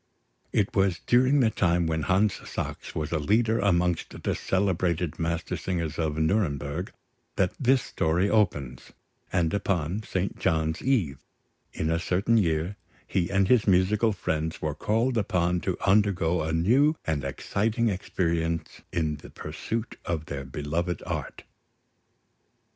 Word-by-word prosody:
It 105 +4 0
was 95 -3 +3
during 130 +3 +4
the 115 -3 +3
time 85 -3 +2
when 80 -1 0
Hans 95 +5 +2 0.2
Sachs - - -5
was 75 -1 -2
a 80 - +1
leader 110 +8 +2
amongst 90 -3 0
the - - +1
celebrated 90 -4 0
Mastersingers 85 0 -2
of 80 -2 -1
Nuremberg, 80 -2 0 0.4
that 90 -2 +1
this 130 0 +3
story 85 -5 +1
opens; 80 - 0 0.4
and 85 -3 +1
upon 95 -1 -1
St. 95 -2 -3
John's 80 -1 0
Eve 100 - +1 0.5
in 80 +1 -2
a 85 - +1
certain 95 +6 +2
year, 85 +1 0 0.3
he 85 -3 0
and 95 -1 +2
his 120 -2 +4
musical 100 +4 +3
friends 80 -4 -2
were 75 -1 -2
called 115 - +1
upon 90 -3 +1
to 95 - -2
undergo 95 -4 +3
a 80 +1 -2
new 125 - +3
and 75 -4 -1
exciting 110 - 0
experience 85 -4 -2
in 80 -3 -1
the - - -12
pursuit 115 0 -5
of 80 -3 -3
their 70 -3 -5
beloved 80 +6 -3
art. - - -5
90 Hz, 135 wpm, -27 LUFS, 80-105 Hz, 0.5 s, during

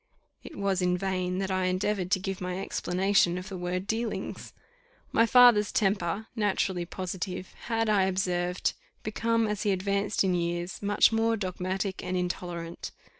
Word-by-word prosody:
It - - -10
was 195 -2 0
in 180 0 +2
vain 185 -1 -1
that 195 0 -2
I 185 0 +1
endeavoured 185 0 0
to 190 - +2
give 190 0 -4
my 180 0 -3
explanation 190 -1 +1
of 180 +3 -6
the 195 - -6
word 180 +1 -3
dealings. 225 +2 -3 0.6
My 230 - +4
father's 240 -4 +6
temper, 195 -1 0
naturally 190 -5 0
positive, 185 0 -5
had, 225 -1 0
I 205 -3 +4
observed, 180 -1 0 0.3
become, 230 +1 +1
as 210 -1 -2
he 210 - +1
advanced 200 +2 +1
in 190 -1 +2
years, 175 +1 -2
much 205 +2 +4
more 225 0 +2
dogmatic 190 0 -3
and 185 - -2
intolerant. 175 -1 -4
190 Hz, 155 wpm, -28 LUFS, 180-205 Hz, 0.6 s, father's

